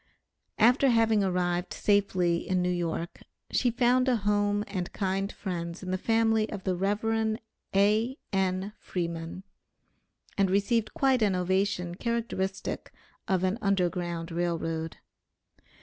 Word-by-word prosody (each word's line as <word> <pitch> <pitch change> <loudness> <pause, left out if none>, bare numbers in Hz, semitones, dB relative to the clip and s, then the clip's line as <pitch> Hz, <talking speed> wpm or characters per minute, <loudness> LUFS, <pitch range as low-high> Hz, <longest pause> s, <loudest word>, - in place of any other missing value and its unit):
After 250 +5 +5
having 225 -3 +3
arrived 180 -1 0
safely 185 -4 +2
in 185 -1 +2
New 180 - +1
York, 170 -1 -3 0.3
she 250 - +2
found 250 +2 +3
a 250 - +4
home 205 -1 +1
and 180 -3 -4
kind 195 0 -1
friends 170 -2 -5
in 185 - -4
the - - +1
family 225 0 +2
of 200 -3 -6
the 185 -2 0
Rev. 220 +3 0 0.4
A.N. 200 -2 +1
Freeman, 170 0 -4 1.0
and 195 -1 +4
received 215 +3 +1
quite 265 -3 +3
an 200 -3 +3
ovation 180 -1 0
characteristic 195 -3 -3 0.4
of 190 -1 +1
an 190 +5 0
Underground 175 -3 -1
Rail 170 0 0
Road. 165 0 -4
195 Hz, 125 wpm, -28 LUFS, 180-220 Hz, 1.0 s, After